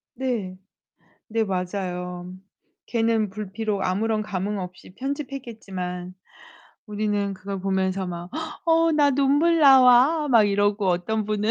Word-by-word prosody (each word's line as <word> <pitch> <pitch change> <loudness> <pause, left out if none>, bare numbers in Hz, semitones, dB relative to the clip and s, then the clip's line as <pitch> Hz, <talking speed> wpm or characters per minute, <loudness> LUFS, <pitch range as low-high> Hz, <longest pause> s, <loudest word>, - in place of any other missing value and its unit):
네. 230 -8 -3 0.7
네 225 +1 0
맞아요. 180 -2 -4 0.5
걔는 225 -2 +1
불피로 205 0 -3
아무런 215 +4 0
감흥없이 190 -2 -5
편집했겠지만 220 -10 -6 0.7
우리는 205 -1 -1
그걸 195 +1 -6
보면서 190 0 -1
막 175 0 -6 0.4
"어 330 0 +4
나 290 -2 +4
눈물 285 +5 +3
나와." 270 +3 +6
막 230 -4 +6
이러고 205 0 +1
어떤 185 +5 0
분은 210 +1 -1
210 Hz, 240 characters per minute, -24 LUFS, 185-245 Hz, 0.7 s, 나와